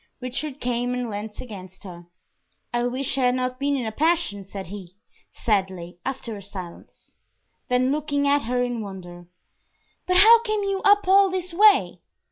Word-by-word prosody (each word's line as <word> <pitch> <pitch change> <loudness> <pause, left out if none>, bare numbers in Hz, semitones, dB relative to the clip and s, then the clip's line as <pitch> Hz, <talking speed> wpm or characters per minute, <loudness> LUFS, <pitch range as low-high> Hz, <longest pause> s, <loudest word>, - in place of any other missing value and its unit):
Richard 260 +3 -4
came 245 0 -1
and 245 -2 -3
leant 210 +1 -6
against 190 -6 -10
her. 175 -3 -11 0.7
"I 240 0 0
wish 270 +2 -2
I 255 - +2
had 250 0 +3
not 255 0 -2
been 285 0 0
in 255 -4 -2
a 220 - -3
passion!" 315 - 0
said 195 0 -8
he, 185 -1 -10 0.4
sadly, 190 -5 -2
after 255 -4 -5
a 200 - -9
silence; 185 -3 -11 0.6
then 250 +1 +2
looking 285 -1 0
at 285 -1 +2
her 245 +1 0
in 245 -2 -3
wonder 175 -3 -9 0.8
"But 365 0 +3
how 455 +4 +8
came 430 -3 -1
you 395 -1 -1
up 405 -1 +4
all 390 +1 +6
this 365 -1 -4
way?" 415 +2 +4
250 Hz, 170 wpm, -24 LUFS, 200-305 Hz, 0.8 s, how